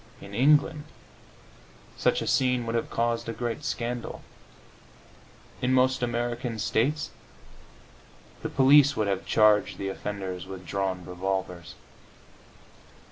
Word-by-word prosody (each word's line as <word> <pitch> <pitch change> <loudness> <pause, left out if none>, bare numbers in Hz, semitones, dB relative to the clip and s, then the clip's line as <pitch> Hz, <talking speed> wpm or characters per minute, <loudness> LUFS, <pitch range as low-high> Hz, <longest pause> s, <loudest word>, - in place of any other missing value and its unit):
In 100 - -11
England 145 +5 +3 1.1
such - - +1
a - - -5
scene 125 -2 +2
would 115 - -3
have 115 - -1
caused 115 0 -1
a - - -2
great 120 +4 -4
scandal; 120 -3 -4 1.4
in 130 +1 +2
most 130 0 +3
American 120 0 -2
States 135 +8 0 1.3
the - - -3
police 140 +1 +5
would 110 -2 +1
have 95 -1 -2
charged 105 -3 +4
the 100 - -3
offenders 95 -2 -5
with 95 -1 -9
drawn 95 -1 -2
revolvers. 90 -1 -4
115 Hz, 115 wpm, -27 LUFS, 95-125 Hz, 1.4 s, police